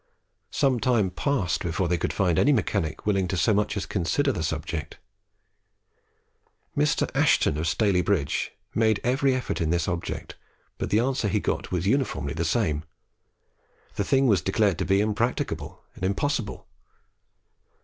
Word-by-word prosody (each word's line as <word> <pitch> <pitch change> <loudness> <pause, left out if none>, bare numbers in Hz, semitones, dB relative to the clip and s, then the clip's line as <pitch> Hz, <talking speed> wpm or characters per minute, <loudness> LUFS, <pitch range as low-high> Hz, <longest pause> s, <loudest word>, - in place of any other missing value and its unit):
Some 135 -4 +1
time 110 -5 +2
passed 120 - -1
before 85 0 -1
they 85 0 0
could - - -1
find 90 -5 +1
any 145 - +4
mechanic 100 - -1
willing 95 -3 +1
so 95 +4 +2
much 105 +1 0
as 100 - -1
to - - -8
consider 105 - +1
the 90 - -3
subject. 80 -1 -4 1.8
Mr. 75 - +2
Ashton - - +3
of 80 +2 -2
Staley 95 +1 +2
bridge 90 -8 0 0.2
made 110 -2 +2
every 130 +2 +2
effort 130 - -3
with 80 -3 0
this 85 0 0
object, 85 -1 -4 0.4
but - - -2
the 105 - +3
answer 125 -1 +1
he 100 - +1
got - - -2
was 90 0 -1
uniformly 105 - 0
the 80 - -2
same. 80 -5 0 1.1
The - - -1
thing 135 0 +2
was 100 -8 +4
declared 100 +1 +1
to - - 0
be 95 +1 +3
impracticable 110 +3 -2
and - - -11
impossible. 105 +4 -1
100 Hz, 155 wpm, -26 LUFS, 85-120 Hz, 1.8 s, any